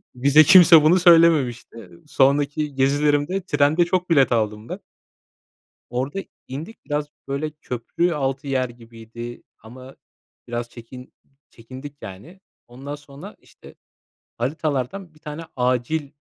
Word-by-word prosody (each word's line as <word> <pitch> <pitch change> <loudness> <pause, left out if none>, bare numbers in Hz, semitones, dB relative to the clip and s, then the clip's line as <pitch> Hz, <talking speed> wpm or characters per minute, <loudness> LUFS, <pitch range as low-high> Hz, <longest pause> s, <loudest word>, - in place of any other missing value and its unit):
Bize 140 +5 +5
kimse 175 -3 +8
bunu 175 +4 +5
söylememişti. 155 - +3 0.2
Sonraki 145 +1 +1
gezilerimde 145 +6 +1
trende 150 +2 +2
çok 180 0 -1
bilet 140 -6 +4
aldım 110 -1 -1
ben. - - -6 1.1
Orada 130 +9 -3 0.3
indik. 155 - -9
Biraz 145 0 -2 0.2
böyle 140 +3 -3
köprü 150 +4 -3
altı 135 0 -3
yer 130 -2 -1
gibiydi 115 0 -11 0.2
ama 130 +4 -13 0.5
biraz 120 0 -4
çekin 125 +2 -13 0.4
çekindik, 130 +5 -11
yani. 105 - -11 0.3
Ondan 135 +4 -8
sonra, 145 +7 -13
işte - - -18 0.6
haritalardan 155 +6 -3
bir - - -21
tane 150 +1 -8
acil 125 +4 -1
140 Hz, 115 wpm, -22 LUFS, 125-155 Hz, 1.1 s, kimse